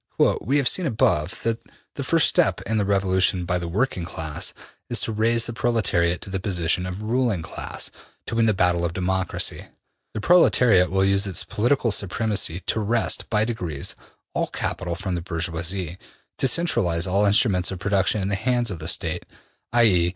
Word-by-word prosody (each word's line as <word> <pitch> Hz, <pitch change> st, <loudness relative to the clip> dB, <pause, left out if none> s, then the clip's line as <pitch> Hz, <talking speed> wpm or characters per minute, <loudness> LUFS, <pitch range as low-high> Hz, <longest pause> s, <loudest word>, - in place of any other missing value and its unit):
``We 140 Hz, +3 st, +2 dB
have 140 Hz, -3 st, +2 dB
seen 180 Hz, +4 st, +2 dB
above, 90 Hz, -, 0 dB
that 115 Hz, 0 st, 0 dB, 0.3 s
the -, -, -5 dB
first -, -, +3 dB
step -, -, +2 dB
in 110 Hz, +3 st, -2 dB
the 105 Hz, -, +1 dB
revolution 95 Hz, -2 st, +2 dB
by 90 Hz, 0 st, 0 dB
the 85 Hz, -, -5 dB
working 95 Hz, +1 st, -1 dB
class, 80 Hz, -3 st, -3 dB, 0.4 s
is -, -, +1 dB
to -, -, -2 dB
raise 115 Hz, +2 st, +1 dB
the 120 Hz, -, -4 dB
proletariat 100 Hz, -8 st, +1 dB
to 95 Hz, -, -9 dB
the 95 Hz, -, -1 dB
position 90 Hz, -2 st, 0 dB
of 90 Hz, +3 st, -6 dB
ruling 115 Hz, -5 st, 0 dB
class, -, -, -5 dB, 0.3 s
to -, -, -6 dB
win 115 Hz, 0 st, +3 dB
the 110 Hz, -, +3 dB
battle 90 Hz, -2 st, +2 dB
of 85 Hz, 0 st, -1 dB
democracy. 95 Hz, +1 st, -2 dB, 0.5 s
The -, -, -2 dB
proletariat 115 Hz, -, +4 dB
will 95 Hz, +1 st, +2 dB
use 100 Hz, +1 st, +2 dB
its 95 Hz, -4 st, -2 dB
political 120 Hz, +1 st, +1 dB
supremacy 100 Hz, -3 st, 0 dB
to 110 Hz, -, -1 dB
wrest, 110 Hz, +2 st, 0 dB
by 110 Hz, -1 st, +2 dB
degrees, 90 Hz, -11 st, -4 dB, 0.4 s
all -, -, 0 dB
capital 85 Hz, -2 st, -3 dB
from 95 Hz, +1 st, -4 dB
the 85 Hz, -, -2 dB
bourgeoisie, 85 Hz, +1 st, -3 dB, 0.4 s
to 135 Hz, -, +3 dB
centralize 115 Hz, -, +1 dB
all 100 Hz, +2 st, +2 dB
instruments 100 Hz, -3 st, +3 dB
of 95 Hz, -, -4 dB
production 95 Hz, +1 st, +1 dB
in -, -, -1 dB
the -, -, -1 dB
hands 120 Hz, +2 st, 0 dB
of 90 Hz, -, -5 dB
the 80 Hz, -, -6 dB
State, -, -, -1 dB, 0.5 s
i.e. 100 Hz, -8 st, +4 dB
95 Hz, 180 wpm, -23 LUFS, 90-115 Hz, 0.5 s, proletariat